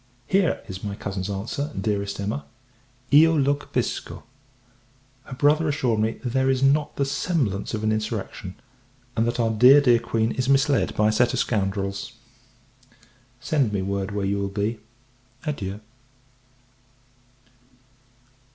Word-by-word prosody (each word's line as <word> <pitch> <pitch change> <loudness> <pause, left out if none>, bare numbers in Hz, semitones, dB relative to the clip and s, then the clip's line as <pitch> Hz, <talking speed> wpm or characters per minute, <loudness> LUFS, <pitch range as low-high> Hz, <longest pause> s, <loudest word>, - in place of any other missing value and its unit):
V. 190 - +4
Here 180 -6 0
is 95 -2 -8
my 100 -1 -4
cousin's 95 -1 -4
answer, 115 +9 -3
Dearest 100 -2 -2
Emma 105 +8 -3 0.7
"Io 160 +3 +7
lo 140 0 +3
capisco." 145 +1 -4 1.0
Her 130 - -8
brother 150 +4 +3
assured 125 -6 0
me, 110 +1 +1
there 130 +1 +1
is 135 0 +1
not 145 +2 +2
the 140 - 0
semblance 135 - -1
of 110 - -5
an 110 - +2
insurrection; 110 -4 -4 0.6
and, 115 0 +1
that 120 +1 -2
our 115 -1 +2
dear, 125 +6 +7
dear 125 -5 +4
Queen, 115 -1 -1
is 130 +1 -2
misled 140 0 +2
by 105 0 +3
a - - +2
set 120 +3 +2
of - - -1
scoundrels. 100 +1 -2 1.3
Send 135 -5 0
me 100 -2 -1
word 100 0 -2
where 100 -1 -2
you 100 +1 0
will 100 - -1
be. 105 +3 -2 0.7
Adieu! 105 -9 -4
115 Hz, 140 wpm, -24 LUFS, 100-135 Hz, 1.3 s, Io